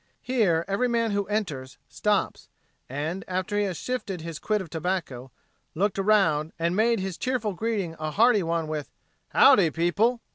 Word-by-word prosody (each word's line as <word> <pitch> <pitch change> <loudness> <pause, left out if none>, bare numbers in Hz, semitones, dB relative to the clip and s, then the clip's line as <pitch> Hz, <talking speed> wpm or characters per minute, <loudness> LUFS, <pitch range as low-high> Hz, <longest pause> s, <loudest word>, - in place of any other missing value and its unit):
Here 200 -10 +1
every 200 +6 +1
man 230 -2 +1
who 200 -1 -1
enters 160 -12 -3
stops; - - -1 0.4
and, 155 +8 -3
after 185 +2 -2
he 205 0 +2
has 185 -4 -3
shifted 210 -8 -4
his 165 -1 -6
quid 215 -1 0
of 190 - -6
tobacco, 160 -7 -3 0.5
looked 195 +3 0
around, 170 -7 +2
and 170 +2 0
made 230 +2 +3
his 190 -2 -4
cheerful 245 -5 -1
greeting 200 -4 -2
a 155 0 -2
hearty 220 +5 +4
one 165 -2 -1
with, 155 -2 -4 0.4
"Howdy 205 -12 +6
people!" 195 - +1
190 Hz, 160 wpm, -26 LUFS, 165-215 Hz, 0.5 s, Howdy